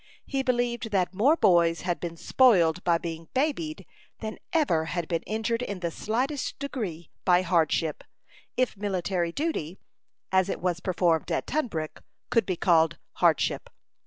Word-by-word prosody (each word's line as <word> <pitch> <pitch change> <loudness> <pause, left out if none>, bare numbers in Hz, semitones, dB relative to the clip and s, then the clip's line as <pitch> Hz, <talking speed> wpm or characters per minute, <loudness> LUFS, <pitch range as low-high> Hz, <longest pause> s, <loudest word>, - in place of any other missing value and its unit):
He 270 -1 -1
believed 245 -2 0
that 190 -3 0
more 250 +11 +4
boys 170 - +4
had 175 -1 -1
been 170 -1 -5
spoiled 180 -8 +4
by 170 -1 +3
being 165 -1 -6
"babied" 310 +3 -1 0.3
than 220 -1 -6
ever 280 - +2
had 170 0 -3
been 165 -2 -1
injured 225 +2 -1
in 200 -7 -4
the 170 -2 -1
slightest 255 - -2
degree 210 - -5
by 180 0 +4
hardship 165 -2 +1 0.5
if 255 -2 +1
military 185 -3 -1
duty, 190 - -3 0.5
as 190 0 +3
it - - -2
was 175 -1 -1
performed 175 -3 +1
at - - 0
Tunbrook, 200 - -3 0.3
could 230 -5 +3
be 185 -3 -1
called 165 -2 +3 0.2
hardship. - - +2
185 Hz, 150 wpm, -27 LUFS, 170-240 Hz, 0.5 s, more